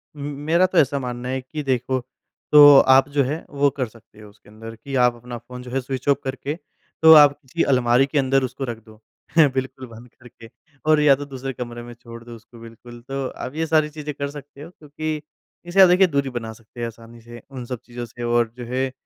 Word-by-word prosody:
उम, 145 - -10 0.3
मेरा 170 +3 +4
तो 185 - -1
ऐसा 140 0 +3
मानना 125 0 -5
है 130 0 -2
कि 150 +4 -7
देखो, 130 0 -1 0.5
तो 145 -2 +9
आप 135 +1 +5
जो 140 -1 +1
है, 150 +6 -4
वो 140 0 +1
कर 130 -3 -1
सकते 110 -1 -20
हो 105 - -13
उसके 105 0 -22
अंदर 115 +1 -11
कि 135 +4 -8
आप 120 -1 +1
अपना 120 0 -9
फ़ोन 125 +2 -11
जो 125 - -10
है, 135 0 -1
स्विच 130 +1 -6
ऑफ़ 140 - +4
करके, 135 +2 -4 0.5
तो 160 0 +9
आप 145 -1 +6
किसी 160 +5 -2
अलमारी 125 +1 +3
के 145 +1 -4
अंदर 135 0 +1
उसको 130 +2 -5
रख 115 - -5
दो। 110 0 -18 0.5
बिल्कुल 130 0 -4
बंद 115 +2 -13
करके 120 -2 -15 0.4
और 155 -1 +5
या 145 -2 +6
तो 145 +1 -7
दूसरे 135 -1 -6
कमरे 120 -1 -7
में 120 0 -10
छोड़ 115 0 -13
दो 120 0 -11
उसको, 115 +1 -17
बिल्कुल। 115 +1 -13
तो 135 -1 -3
आप 130 - -8
ये 160 0 -1
सारी 155 -1 +2
चीज़ें 150 -1 -7
कर 140 -1 -4
सकते 145 0 -12
हो, 165 - -10
क्योंकि 155 -1 -6 0.4
इससे 185 +3 +3
आप, 185 - +9
देखिए, 185 +1 +5
दूरी 140 -3 -1
बना 115 -3 -6
सकते 115 +2 -17
हैं 120 - -2
आसानी 115 +1 -13
से, 120 +1 -12
उन 130 -3 -8
सब 125 -1 -6
चीज़ों 120 0 -7
से, 120 +1 -10
और 120 -1 +1
जो 120 - -7
है 130 0 -1
130 Hz, 235 wpm, -22 LUFS, 120-145 Hz, 0.5 s, तो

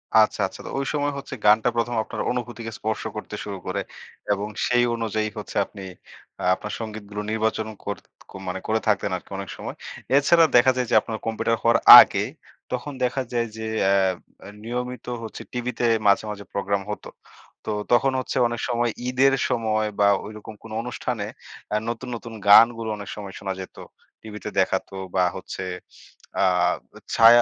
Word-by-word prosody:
আচ্ছা, 110 -1 +5
আচ্ছা। - - -12
তো, - - -6
ঐ - - +1
সময় 145 -1 0
হচ্ছে, 140 - -7
গানটা 105 +3 +5
প্রথম 120 +1 0
আপনার - - -5
অনুভূতিকে 120 -2 -4
স্পর্শ 110 0 -2
করতে 105 0 -6
শুরু 100 -1 -5
করে। 95 +2 -1 0.5
এবং 100 +1 0 0.2
সেই 120 0 +3
অনুযায়ী 110 -2 -1
হচ্ছে, 105 - -7
আপনি 100 - -12 0.6
আ - - -5
আপনার 105 +2 -7
সঙ্গীতগুলো 105 -2 -6
নির্বাচনও 110 0 -1
করত 100 -2 -4 0.3
ক - - -16 0.2
মানে 90 +1 -3
করে 110 +1 +2
থাকতেন 100 -2 +1
আরকি, - - -16
অনেক 100 -1 -6
সময়। - - -6 0.4
এছাড়া 165 +4 +5
দেখা 120 +2 +7
যায় 125 - 0
যে, - - +4
আপনার 110 -1 -5
কম্পিউটার 115 0 0
হওয়ার 115 0 +5 0.2
আগে, - - +1 0.5
তখন 125 +4 -3
দেখা 125 +2 0
যায় 120 -1 0
যে 110 - -5 0.2
অ্যা 95 0 0
নিয়মিত 125 +1 -4 0.2
হচ্ছে 110 - -7
টিভিতে 125 0 -3 0.2
মাঝে, 100 - +4
মাঝে, 105 -1 -7
প্রোগ্রাম 100 0 -1
হত। 105 - -6 0.6
তো, - - -4 0.2
তখন 135 +3 +4
হচ্ছে 130 - -3
অনেক 120 0 -4
সময় 120 0 +1 0.2
ঈদের 130 +2 +3 0.2
সময় 110 -2 0
বা 100 - +5 0.2
ঐরকম 110 +1 -9
কোন 115 - -11
অনুষ্ঠানে 120 -2 -3 0.5
আ - - +2
নতুন, 120 +2 -5
নতুন, 115 0 -8
গানগুলো 115 +2 +7
অনেক 100 - -8
সময় 100 -2 -8
শোনা 95 -1 -3
যেত। 95 - -10 0.5
টিভিতে 105 -1 -7
দেখাতো, 95 +1 0 0.2
বা 90 - +4
হচ্ছে - - -6 0.8
আ - - +4 0.7
ছায়া 115 +1 +8
110 Hz, 165 wpm, -24 LUFS, 105-120 Hz, 0.8 s, ছায়া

